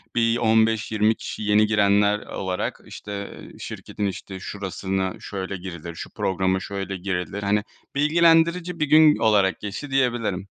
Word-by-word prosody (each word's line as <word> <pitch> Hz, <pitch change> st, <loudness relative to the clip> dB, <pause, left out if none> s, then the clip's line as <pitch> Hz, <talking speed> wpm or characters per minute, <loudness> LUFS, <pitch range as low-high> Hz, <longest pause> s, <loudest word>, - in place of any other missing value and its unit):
Bir, 115 Hz, 0 st, +3 dB
15-20 110 Hz, -1 st, +2 dB
kişi -, -, -6 dB
yeni 105 Hz, +1 st, +4 dB
girenler 105 Hz, -1 st, +3 dB
olarak 95 Hz, -2 st, -4 dB
işte, 100 Hz, -1 st, -7 dB, 0.2 s
eee, -, -, -16 dB
"Şirketin 105 Hz, -, -5 dB
işte 95 Hz, 0 st, -5 dB
şurasına 95 Hz, -1 st, -3 dB
şöyle 95 Hz, -1 st, -5 dB
girilir, 85 Hz, -2 st, -8 dB
şu -, -, -7 dB
programa 95 Hz, 0 st, 0 dB
şöyle 95 Hz, 0 st, -5 dB
girilir." 95 Hz, +1 st, -3 dB
hani 105 Hz, +1 st, +1 dB, 0.3 s
bilgilendirici 165 Hz, +3 st, +3 dB
bir 155 Hz, -, +2 dB
gün 155 Hz, +1 st, +6 dB
olarak 100 Hz, -4 st, +3 dB
geçti 105 Hz, +8 st, -6 dB
diyebilirim. 120 Hz, -8 st, 0 dB
105 Hz, 135 wpm, -24 LUFS, 95-115 Hz, 0.3 s, gün